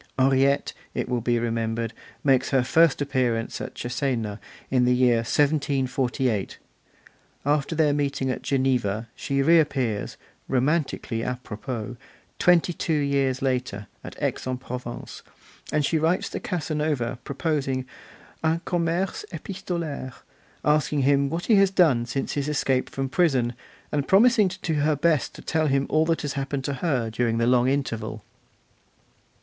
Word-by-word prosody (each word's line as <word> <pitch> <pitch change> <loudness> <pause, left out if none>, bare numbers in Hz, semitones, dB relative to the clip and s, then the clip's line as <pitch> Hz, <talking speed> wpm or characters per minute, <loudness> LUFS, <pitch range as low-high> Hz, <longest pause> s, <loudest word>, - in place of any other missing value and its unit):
Henriette, 135 +1 +3 0.2
it - - -1
will 125 -1 -1
be 120 +1 +1
remembered, 115 -1 -1 0.3
makes 135 -2 +3
her 135 -2 +3
first 150 +3 +4
appearance 125 -5 -1
at - - -6
Cesena, 120 -4 -2 0.3
in 130 -2 +3
the 125 0 +4
year 125 -2 +4
1748; 130 -4 0 0.9
after 145 +2 +1
their 150 -2 +3
meeting 140 -2 0
at - - -4
Geneva, 120 -5 0
she 140 0 -1
reappears, 135 -9 +2 0.3
romantically 135 -3 0
'a 125 +1 -3
propos', 115 +2 -5 0.4
twenty 175 0 +4
two 160 -1 -1
years 140 -3 +1
later, 125 -6 -1 0.2
at - - -8
Aix - - -2
in 130 0 -1
Provence; 125 -1 -7 0.5
and 150 -1 +2
she 160 +2 +1
writes 165 +4 +1
to - - -4
Casanova 150 - -2
proposing 140 -3 -1 0.6
'un 160 +1 +2
commerce 175 - -1
epistolaire', 170 -9 -5 0.5
asking 150 -1 +2
him 140 0 +3
what 165 +3 -3
he 220 - +5
has 195 -1 +5
done 155 -11 +3
since 135 +3 -2
his 145 0 -1
escape 135 -3 0
from 135 0 -3
prison, 130 -6 +2 0.4
and 145 -1 -1
promising 215 0 +5
to 190 - -7 0.2
do 150 - 0
her 150 +1 +2
best 155 0 +1
to - - -11
tell 160 -1 +1
him 135 0 +2
all 155 +1 +3
that 165 -2 0
has 145 - -2
happened 140 0 -3
to 140 - -2
her 125 -9 0
during 115 0 0
the 115 - +2
long 125 0 +4
interval. 115 -6 -2
135 Hz, 145 wpm, -25 LUFS, 125-155 Hz, 0.9 s, he